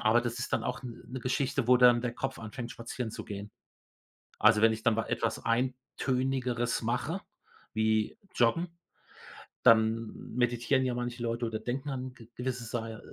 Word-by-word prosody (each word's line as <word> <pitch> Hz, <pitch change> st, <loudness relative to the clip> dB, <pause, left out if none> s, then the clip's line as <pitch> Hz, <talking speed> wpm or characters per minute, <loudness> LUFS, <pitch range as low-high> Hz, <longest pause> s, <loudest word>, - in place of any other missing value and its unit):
aber 110 Hz, +2 st, +4 dB
das 120 Hz, 0 st, -3 dB
ist 120 Hz, -, -4 dB
dann -, -, +1 dB
auch 125 Hz, -, -3 dB
'n 120 Hz, -2 st, -8 dB
'ne 130 Hz, +1 st, -6 dB
Geschichte, 130 Hz, 0 st, 0 dB
wo 125 Hz, -, +8 dB
dann 120 Hz, -1 st, +7 dB
der 120 Hz, -1 st, -2 dB
Kopf 135 Hz, 0 st, -3 dB
anfängt, 115 Hz, +2 st, -6 dB
spazieren 115 Hz, 0 st, -5 dB
zu -, -, -7 dB
gehen. 100 Hz, 0 st, -6 dB, 0.9 s
Also, 110 Hz, 0 st, +6 dB
wenn 115 Hz, 0 st, +7 dB
ich 110 Hz, 0 st, -5 dB
dann 115 Hz, -2 st, +3 dB
wa 115 Hz, -, 0 dB
etwas -, -, -1 dB
eintönigeres 125 Hz, -1 st, 0 dB
mache 125 Hz, +10 st, -1 dB, 0.5 s
wie 110 Hz, -, +1 dB, 0.2 s
Joggen, 125 Hz, +9 st, +3 dB, 1.0 s
dann 110 Hz, 0 st, +4 dB, 0.2 s
meditieren 120 Hz, +2 st, +2 dB
ja 125 Hz, -, 0 dB
manche 120 Hz, 0 st, -3 dB
Leute 115 Hz, 0 st, -1 dB
oder 110 Hz, -1 st, -2 dB
denken 130 Hz, +5 st, -3 dB
an 130 Hz, -1 st, -4 dB
g 115 Hz, -3 st, -14 dB
gewisse 125 Hz, -1 st, -3 dB
Sai 115 Hz, -1 st, -3 dB
äh, 110 Hz, -, -9 dB
120 Hz, 175 wpm, -30 LUFS, 115-130 Hz, 1.0 s, wo